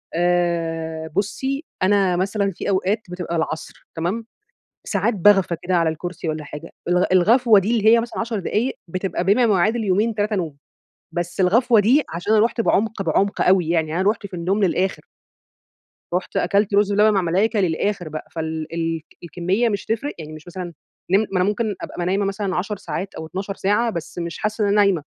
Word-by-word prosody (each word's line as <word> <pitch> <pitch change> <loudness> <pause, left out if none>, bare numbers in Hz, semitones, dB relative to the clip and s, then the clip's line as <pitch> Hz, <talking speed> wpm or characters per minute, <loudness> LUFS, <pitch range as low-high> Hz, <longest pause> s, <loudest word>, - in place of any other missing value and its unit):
آآ، 165 -2 0
بُصّي 265 +8 -1 0.2
أنا 195 -2 +3
مثلًا 195 +2 0
في 170 - -5
أوقات 195 +2 +1
بتبقى 180 -1 -4
العصر، 160 -1 -4
تمام، 180 +8 -2 0.6
ساعات 205 +3 +1
باغفى 195 -2 +4
كده 180 +1 0
على 165 -2 +3
الكرسي 170 +1 -5
والّا 155 0 -3
حاجة 150 +3 -9 0.2
الغ 180 +1 +3
الغفوة 220 +4 +5
دي 205 +5 -1
اللي 215 - -1
هي 230 +1 +6
مثلًا 235 +1 -4
10 225 -2 -2
دقايق 220 +7 -1
بتبقى 185 0 -2
بما 205 +6 +3
يعادل 220 +6 +1
يومين، 210 +4 +1
3 210 0 0
نوم. 165 -6 -3 0.6
بس 175 +2 -3
الغفوة 225 +5 +4
دي 250 +9 +4
عشان 175 +6 -1
أنا 215 0 +5
رُحت 235 0 -1
بعمق، 220 -1 +1
بعمق 195 +4 0
أوي 180 -3 +3
يعني 160 -2 0
أنا - - +2
رُحت 215 -2 -5
في 190 - -11
النوم 190 +4 0
للآخر. 185 +1 -1 1.1
رُحت 180 +1 -2
أكلت 200 0 +1
رز 205 0 +4
باللبن 210 +1 +4
مع 200 - +3
الملايكة 195 +5 +1
للآخر 180 0 -1
بقى، 155 0 -7
فال 160 -1 -4
ال 165 -1 -2 0.2
الكمية 185 +7 0
مش 205 -2 -3
هتفرق 230 +7 -2
يعني 155 -1 -8
مش 155 +2 -12
مثلًا 180 +1 -6 0.5
نم 195 - +6
ما 190 - 0
أنا - - +3
ممكن 210 +1 -1
أبقى - - -7
م - - -1
نايمة 190 +3 0
مثلًا 195 -1 -2
10 205 +3 -2
ساعات 175 +3 -5
أو 160 - -6
12 190 +5 -5
ساعة 210 +5 +1
بس 170 -6 -6
مش 170 -1 -4
حاسة 215 0 -1
إن - - +2
أنا 200 - +2
نايمة. 200 -6 +3
190 Hz, 190 wpm, -21 LUFS, 170-210 Hz, 1.1 s, هي